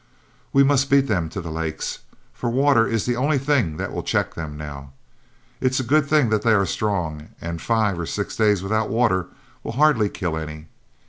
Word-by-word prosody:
We 140 - +5
must 140 0 +2
beat 140 0 +5
them 90 -9 -1
to 95 - -5
the 80 -1 -6
lakes, 80 -1 -4 0.3
for 120 - -3
water 130 -2 +3
is 115 -3 -1
the 120 - 0
only 140 +4 +1
thing 130 - +1
that - - -4
will - - -2
check - - -1
them 75 -2 -6
now. 70 -2 -8 0.7
It's 130 0 +1
a - - -1
good 145 +4 +2
thing 150 -5 +3
that 110 -1 +1
they 115 -1 +3
are 100 -2 +3
strong, 85 -8 -2
and 85 -1 -5
five 110 -6 +1
or 85 - -3
six 100 - -3
days 105 -4 +2
without 110 +2 0
water 110 -6 +1 0.4
will - - -5
hardly 130 -6 +3
kill 85 -5 -3
any. 75 0 -7
110 Hz, 200 wpm, -22 LUFS, 80-130 Hz, 0.7 s, We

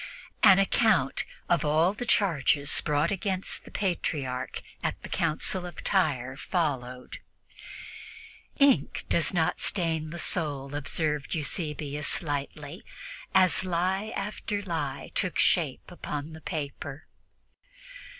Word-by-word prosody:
An 190 - +8
account 195 - +2 0.2
of 170 -2 +2
all 160 +5 +3
the 245 +3 -6
charges 150 - +2
brought 150 +2 +1
against 195 -1 -1
the - - -11
Patriarch 145 -9 -2 0.2
at - - -2
the - - -7
Council 180 +4 +1
of 175 -1 -8
Tyre 135 -9 +1
followed. 130 -6 -3 1.4
"Ink 275 - +3
does 170 - +2
not 170 -4 +1
stain 160 -4 0
the 170 - -6
soul," 145 -6 0
observed 150 +1 -1
Eusebius 150 -2 -1
lightly, 145 +2 -4 0.5
as 185 -2 +5
lie 185 +4 0
after 205 0 -3
lie 150 -7 -3
took 185 -3 0
shape 160 -1 +2
upon 150 -3 -5
the 160 - -10
paper. 145 -1 -5
160 Hz, 110 wpm, -28 LUFS, 145-185 Hz, 1.4 s, An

